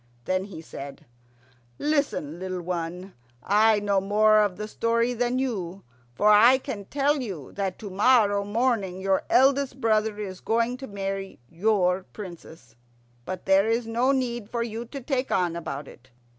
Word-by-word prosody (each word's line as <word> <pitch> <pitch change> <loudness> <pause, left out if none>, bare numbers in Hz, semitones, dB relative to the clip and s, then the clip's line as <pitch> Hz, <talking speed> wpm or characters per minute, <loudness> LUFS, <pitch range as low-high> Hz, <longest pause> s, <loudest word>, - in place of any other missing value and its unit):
Then 185 +1 0
he 195 -5 -9
said, 140 -3 -9 0.7
"Listen, 280 - -1
little 185 -1 -4
one. 180 +2 -4 0.3
I 215 +1 +4
know 200 -1 +1
more 215 +2 +4
of 205 -4 +1
the 210 +1 -5
story 230 +2 0
than 245 +1 0
you, 195 -8 -3 0.3
for 210 +7 +3
I 225 +5 +7
can 205 -6 -6
tell 285 +4 +1
you 185 - -6
that 195 -2 -3
to 205 -3 -8
morrow 205 -1 +3
morning 205 -3 0
your 190 0 +1
eldest 270 0 +3
brother 220 -2 +1
is 190 -3 -6
going 230 +2 0
to 270 0 -8
marry 195 -1 -5
your 185 - +1
Princess. 165 - -11 0.5
But 185 -1 -6
there 195 +2 +4
is 230 +1 +1
no 235 +4 +1
need 240 -5 -2
for 235 0 -1
you 230 +1 -5
to 275 +4 -8
take 265 0 -2
on 175 -3 +1
about 145 -4 -5
it. 130 +1 -16
210 Hz, 160 wpm, -26 LUFS, 185-235 Hz, 0.7 s, I